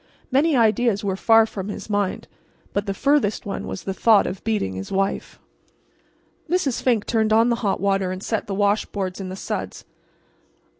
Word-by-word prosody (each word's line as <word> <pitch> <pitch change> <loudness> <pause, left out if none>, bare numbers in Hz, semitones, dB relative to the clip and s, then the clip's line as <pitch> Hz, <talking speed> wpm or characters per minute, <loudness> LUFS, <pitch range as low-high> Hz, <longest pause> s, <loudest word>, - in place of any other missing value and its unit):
Many 285 +4 +3
ideas 225 -1 +2
were 195 -2 -1
far 225 +3 +5
from 200 -3 -6
his 205 - -6
mind; 205 -3 -1 0.5
but 200 +1 -1
the 195 - -1
furthest 280 -5 +1
one 200 - -4
was - - -6
the 195 - -3
thought 215 +1 +4
of 185 - -5
beating 215 - -1
his 95 +1 -7
wife. 195 0 -2 1.1
Mrs. 325 -8 0
Fink 235 -5 +1
turned 220 -2 +1
on 225 +2 +4
the 235 - +1
hot 200 -4 0
water 195 -2 +1
and 185 +1 -6
set 225 0 -2
the 195 - -3
washboards 200 -2 -1
in 185 - -5
the 185 - -5
suds. - - -5
205 Hz, 180 wpm, -22 LUFS, 195-225 Hz, 1.1 s, far